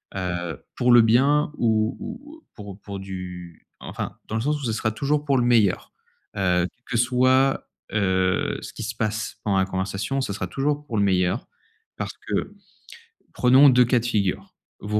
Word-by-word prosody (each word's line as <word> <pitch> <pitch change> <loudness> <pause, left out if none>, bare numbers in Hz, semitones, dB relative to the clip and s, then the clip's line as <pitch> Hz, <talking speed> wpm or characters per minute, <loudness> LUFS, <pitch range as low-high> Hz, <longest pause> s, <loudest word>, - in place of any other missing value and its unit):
heu, 90 -4 -3 0.2
pour 125 0 +2
le 120 -1 +8
bien 135 +7 +3
ou 110 -1 +1
ou, 240 +8 -8
heu, - - -22
pour 100 -1 -10
pour 100 -1 -7
du 90 -3 -8
enfin, - - -6
dans 110 - -4
le 110 - 0
sens 150 +4 0
où - - -4
ce 115 - -1
sera 110 0 -1
toujours 145 +6 -1
pour 140 -2 +2
le 120 - +2
meilleur. 110 -6 +2 0.4
Heu, 90 -2 +2 0.2
que 120 - -2
ce 115 - +4
soit, 130 +2 +2 0.2
heu, 95 -3 +1
ce - - -9
qui - - -7
se 110 +2 -4
passe 110 0 -3
pendant 100 -2 +1
la 95 - +3
conversation 100 +7 -2
ce 105 - -3
sera 100 - -4
toujours 145 +2 -2
pour 115 - -3
le 100 - +3
meilleur 95 +2 +1 0.5
parce - - -4
que - - -2 0.8
prenons 130 +3 +6
2 125 -1 +5
cas 125 +1 +2
de 115 - -6
figure. 100 -6 -1 0.3
Vous 105 +1 -1
110 Hz, 190 wpm, -24 LUFS, 95-130 Hz, 0.8 s, le